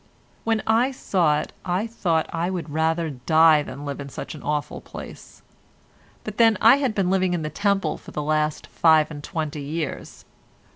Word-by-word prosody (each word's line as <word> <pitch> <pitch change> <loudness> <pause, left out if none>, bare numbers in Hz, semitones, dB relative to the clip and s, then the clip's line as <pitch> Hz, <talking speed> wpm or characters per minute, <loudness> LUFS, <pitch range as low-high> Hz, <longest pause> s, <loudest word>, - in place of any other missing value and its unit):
When 225 -1 +1
I 230 +4 +3
saw 175 - +1
it, - - -9
I 180 +4 -1
thought 175 -8 0
I 170 +1 -1
would 175 -5 -4
rather 160 +1 0
die 155 +4 +4
than 145 0 -8
live 140 0 -5
in 140 0 -7
such - - -7
an 155 - -10
awful 150 0 -3
place—but 215 -1 -13
then 225 -3 +5
I 230 +5 +7
had 265 -6 -1
been 185 -2 +1
living 185 -2 +2
in 165 - -3
the 155 - -4
Temple 200 -2 0
for - - -13
the 150 - -4
last 155 0 0
five 160 -1 +3
and 145 -1 -8
twenty 155 -4 -4
years. 150 +1 -5
160 Hz, 180 wpm, -23 LUFS, 150-195 Hz, -, I